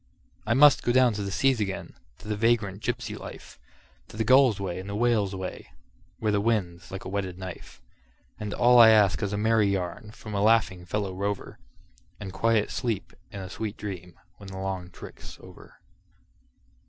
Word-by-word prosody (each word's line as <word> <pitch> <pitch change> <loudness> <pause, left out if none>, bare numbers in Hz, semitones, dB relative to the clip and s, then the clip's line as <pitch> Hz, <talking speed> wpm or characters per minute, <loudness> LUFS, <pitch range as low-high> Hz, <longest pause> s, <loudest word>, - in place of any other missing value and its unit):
I 115 - +2
must 145 0 +7
go 120 - 0
down 125 -1 +4
to 105 - -4
the 100 - -3
seas 130 +6 +2
again, 95 -2 -4 0.2
to - - -14
the 105 - -1
vagrant 105 -3 +1
gypsy 120 -2 -3
life, - - -11 0.5
To - - -12
the 110 - +1
gull's 130 -2 +5
way 95 -2 -4
and 95 +2 -8
the 100 - -4
whale's 105 -4 +1
way, 95 -1 -6 0.5
where 110 -1 0
the 100 -1 +1
wind's 95 -6 -1
like 95 0 -7
a - - -5
whetted 95 -2 -3
knife; 95 -2 -9 0.6
And 105 -1 -4
all 120 +2 +5
I 115 -1 +10
ask 105 -3 +4
is 100 -2 -1
a 100 - -2
merry 110 0 +3
yarn 100 +3 -3
from 110 0 -10
a 100 - 0
laughing 105 -5 +2
fellow 95 +2 -2
rover, 100 +1 -4 0.6
And 95 -2 -7
quiet 115 -2 +1
sleep 115 -7 -3 0.2
and 100 -1 -7
a 95 - -8
sweet 110 +1 -5
dream 90 -4 -8 0.2
when 100 - -12
the 95 0 -8
long 95 -2 -4
trick's - - -11
over. - - -15
105 Hz, 190 wpm, -27 LUFS, 95-115 Hz, 0.6 s, I